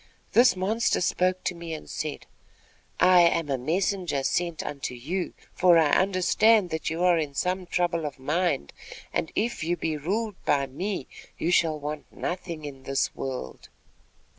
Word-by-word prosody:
This 245 -1 +6
monster 210 +5 +1
spoke 185 +1 +1
to - - -1
me 170 -2 -6
and 155 - -10
said: 155 -2 -5 0.7
"'I 180 -1 +7
am 170 -2 +3
a 135 - +1
messenger 175 0 0
sent 170 +2 -1
unto 140 -3 -4
you, 170 +10 -3 0.2
for 175 -2 +5
I 155 -3 +4
understand 195 +2 +3
that 160 0 -2
you 165 +2 -2
are 175 -2 +4
in 145 -3 -3
some 180 +3 -1
trouble 170 -3 0
of 140 - -8
mind, 150 - -1 0.4
and 160 - -1
if 230 -5 -1
you 175 +2 0
be 160 -1 -2
ruled 200 +7 -3
by 140 -2 +2
me, 175 +4 -4 0.3
you 170 - 0
shall 160 -3 +3
want 150 +1 -5
for - - -24
nothing 170 -4 -4
in 135 -2 -8
this 135 +1 -1
world.' 130 - -6
170 Hz, 165 wpm, -26 LUFS, 150-185 Hz, 0.7 s, I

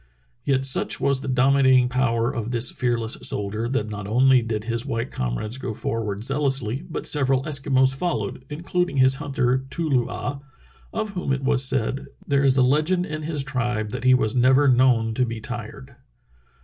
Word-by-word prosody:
Yet 135 -1 +1
such 135 - +1
was 140 -1 +1
the - - -6
dominating 130 0 +4
power 125 -1 0
of 115 -3 -4
this 120 0 +1
fearless 120 -2 -1
soldier 105 +3 -1
that 120 -5 -1
not 105 -2 -6
only 130 +3 +4
did 110 -2 -3
his 115 0 -2
white 120 -2 -3
comrades 60 - -3
go 130 -5 -5
forward 110 -2 -3
zealously 135 -2 0
but 160 - -5
several 135 -2 +1
Eskimos 135 -3 +1
followed, 150 -4 -3
including 170 0 -2
his 130 0 +4
hunter, 130 -2 0
Too 165 +4 -3
loo 130 -5 +1
ah, 145 -1 -4 0.5
of 215 -2 -3
whom 180 -7 -3
it 135 0 -1
was 135 -1 +3
said: 130 0 0 0.2
"There 140 -1 +1
is 135 -1 +4
a 130 - +5
legend 155 +7 +1
in 155 -2 -5
his 150 -2 -3
tribe 120 -5 -2
that 125 -1 -5
he 130 0 +5
was 120 -1 0
never 130 +3 +4
known 120 -3 +3
to 125 - +1
be 115 -2 -3
tired." 110 - -8
130 Hz, 180 wpm, -23 LUFS, 115-140 Hz, 0.5 s, a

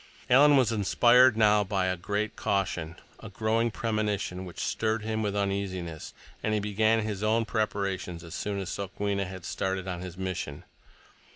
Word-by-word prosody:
Alan 145 +3 +7
was 125 -4 +3
inspired 120 +3 +5
now 105 -1 +5
by 95 -1 -1
a 95 0 0
great 105 +4 -2
caution, 85 -4 -1 0.2
a - - -9
growing 115 +1 0
premonition 105 -4 -2
which 90 - -10
stirred 110 -1 -1
him 110 0 -2
with 105 -2 -1
uneasiness, 95 -5 -3 0.3
and 110 -1 0
he - - +1
began 110 +2 +2
his 105 -2 -4
own 110 +2 +2
preparations 100 -6 -2
as 85 -1 -10
soon 100 -1 -3
as 95 -2 -4
Sokwenna 100 0 -2
had 95 -1 -8
started 95 0 -2
on 90 -2 -4
his 90 -1 -8
mission. 95 -6 -4
100 Hz, 165 wpm, -28 LUFS, 95-110 Hz, 0.3 s, Alan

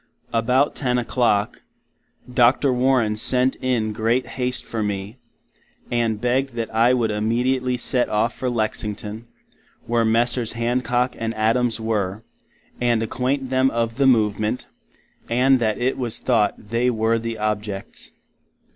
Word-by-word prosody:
About 125 +5 +2
10 125 -3 -1
o'Clock, 115 -4 0 0.7
Dr. 125 +2 +4
Warren 125 -4 +2
Sent 125 +4 +3
in 115 -4 0
great 115 +4 0
haste 125 -1 -2
for 115 - -4
me, 100 +2 -4 0.7
and 115 -3 0
beged 125 +3 0
that 115 -1 -4
I 115 +2 +4
would 120 -4 +1
imediately 125 +4 0
Set 125 0 +2
off 110 +3 +1
for 130 - -2
Lexington, 110 -1 -3 0.6
where 115 0 +1
Messrs. 115 +1 +1
Hancock 120 +1 0
and 115 0 -3
Adams 115 +1 +1
were, 110 -2 -2 0.6
and 120 -2 +2
acquaint 130 +3 -2
them 130 0 +3
of 115 -1 -2
the 140 -1 +3
Movement, 110 -2 +1 0.6
and 130 +2 +3
that 110 -3 0
it 130 +2 -1
was 120 -3 +2
thought 115 -5 +1
they 115 +4 -1
were 115 0 +1
the 115 0 -4
objets. 105 -2 -3
115 Hz, 135 wpm, -22 LUFS, 110-125 Hz, 0.7 s, Dr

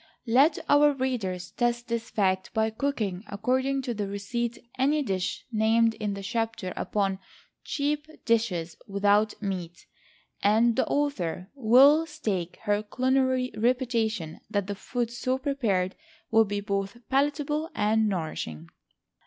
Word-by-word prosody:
Let 270 +7 +4
our 290 0 +5
readers 215 -10 -2
test 240 -1 -1
this 230 -1 -3
fact 190 -2 0
by 220 0 +2
cooking 220 -7 -2
according 260 +6 0
to 245 - -2
the 205 -2 -3
receipt 235 +4 -3 0.2
any 285 +3 +2
dish 190 -6 -2
named 225 +1 +3
in 210 -2 -3
the 200 - -7
chapter 225 -3 -2
upon 195 -2 -1 0.4
"CHEAP 300 +1 -3
DISHES 195 -8 0
WITHOUT 205 +1 +2
MEAT," 180 -3 -4 0.6
and 225 +3 +4
the 260 - +1
author 195 - -1
will 275 +5 +6
stake 210 - -3
her 205 -1 +1
culinary 260 +2 +1
reputation 230 - 0
that 200 -2 0
the 205 - -3
food 235 +3 -3
so 255 +2 -1
prepared 225 -10 0 0.4
will 225 0 +5
be 205 0 -3
both 200 +1 -2
palatable 295 +3 +1
and 215 +1 +2
nourishing. 120 - -4
225 Hz, 130 wpm, -27 LUFS, 200-260 Hz, 0.6 s, will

